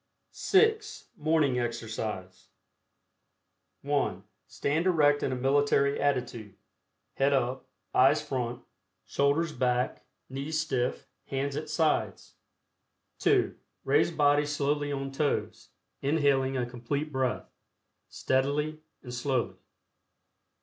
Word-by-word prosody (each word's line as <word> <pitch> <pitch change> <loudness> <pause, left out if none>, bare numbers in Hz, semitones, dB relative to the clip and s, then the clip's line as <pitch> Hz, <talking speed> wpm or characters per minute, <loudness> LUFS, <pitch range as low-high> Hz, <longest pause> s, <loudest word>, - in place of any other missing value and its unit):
(6) 435 +2 +1
MORNING 150 -4 +2
EXERCISE. 110 -6 -4 1.4
(1) 145 0 0 0.2
Stand 160 +5 -1
erect 145 -5 +4
in - - 0
a - - -1
military 140 +2 +2
attitude, 125 -7 -1 0.6
head 140 +1 +2
up, 130 -1 -1 0.2
eyes 130 +1 +5
front, 120 -2 -3 0.4
shoulders 145 +4 +1
back, 125 -1 0 0.2
knees 140 +4 -3
stiff, 130 -5 -1 0.2
hands 140 +1 -2
at 155 +1 -4
sides. 155 0 0 0.9
(2) - - +2 0.3
Raise 145 +5 +3
body 145 -2 +3
slowly 145 0 0
on 135 -1 -3
toes, 145 +1 -2 0.3
inhaling 135 -2 +2
a 125 - 0
Complete 130 +5 -4
Breath, 130 -2 -2 0.6
steadily 145 +4 0 0.2
and 125 -2 -8
slowly. 125 0 -1
140 Hz, 100 wpm, -29 LUFS, 125-150 Hz, 1.4 s, eyes